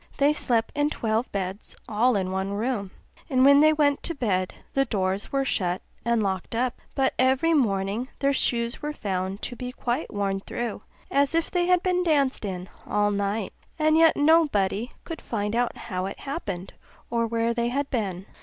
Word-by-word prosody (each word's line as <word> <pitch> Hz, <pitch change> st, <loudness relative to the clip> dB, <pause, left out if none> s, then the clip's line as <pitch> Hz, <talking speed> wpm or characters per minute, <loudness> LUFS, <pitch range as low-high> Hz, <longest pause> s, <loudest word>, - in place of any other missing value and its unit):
They 285 Hz, +1 st, +4 dB
slept 235 Hz, -6 st, 0 dB
in 290 Hz, 0 st, +2 dB
twelve 225 Hz, -3 st, -1 dB
beds 195 Hz, +1 st, -3 dB
all 230 Hz, +3 st, +2 dB
in 185 Hz, -2 st, -1 dB
one 190 Hz, +1 st, -2 dB
room; 210 Hz, -2 st, -1 dB, 0.4 s
and 260 Hz, -2 st, +4 dB
when 280 Hz, 0 st, +8 dB
they 310 Hz, +1 st, +7 dB
went 290 Hz, -2 st, +2 dB
to 335 Hz, -, -2 dB
bed, 190 Hz, -8 st, 0 dB, 0.2 s
the 275 Hz, -, +3 dB
doors 195 Hz, -3 st, -1 dB
were 275 Hz, -1 st, +1 dB
shut 180 Hz, -7 st, -1 dB, 0.2 s
and 235 Hz, -1 st, +2 dB
locked 190 Hz, +2 st, -2 dB
up; 245 Hz, +1 st, -1 dB
but 270 Hz, -1 st, +2 dB
every 265 Hz, +6 st, +3 dB
morning 210 Hz, -3 st, +1 dB
their 280 Hz, 0 st, +2 dB
shoes 235 Hz, -2 st, 0 dB
were 300 Hz, 0 st, -3 dB
found 190 Hz, -4 st, -3 dB
to 245 Hz, -, -3 dB
be 250 Hz, +1 st, -5 dB
quite 250 Hz, +2 st, -2 dB
worn 200 Hz, -2 st, -1 dB
through 230 Hz, +2 st, -4 dB, 0.3 s
as 280 Hz, +2 st, +2 dB
if 330 Hz, -, 0 dB
they 350 Hz, -1 st, +1 dB
had 360 Hz, -1 st, +3 dB
been 360 Hz, -1 st, +2 dB
danced 280 Hz, -8 st, +1 dB
in 185 Hz, -2 st, -4 dB, 0.2 s
all 205 Hz, 0 st, +2 dB
night; 200 Hz, 0 st, -1 dB, 0.2 s
and 310 Hz, 0 st, +3 dB
yet 325 Hz, 0 st, +5 dB
nobody 280 Hz, -, +3 dB
could 330 Hz, -2 st, -7 dB
find 210 Hz, -1 st, -2 dB
out 245 Hz, 0 st, 0 dB
how 185 Hz, -4 st, -3 dB
it 195 Hz, -, -8 dB
happened, 195 Hz, -, -5 dB, 0.4 s
or 230 Hz, -1 st, +1 dB
where 230 Hz, 0 st, 0 dB
they 235 Hz, 0 st, 0 dB
had 280 Hz, +3 st, -1 dB
been. 195 Hz, -6 st, -2 dB
235 Hz, 185 wpm, -26 LUFS, 200-280 Hz, 0.4 s, when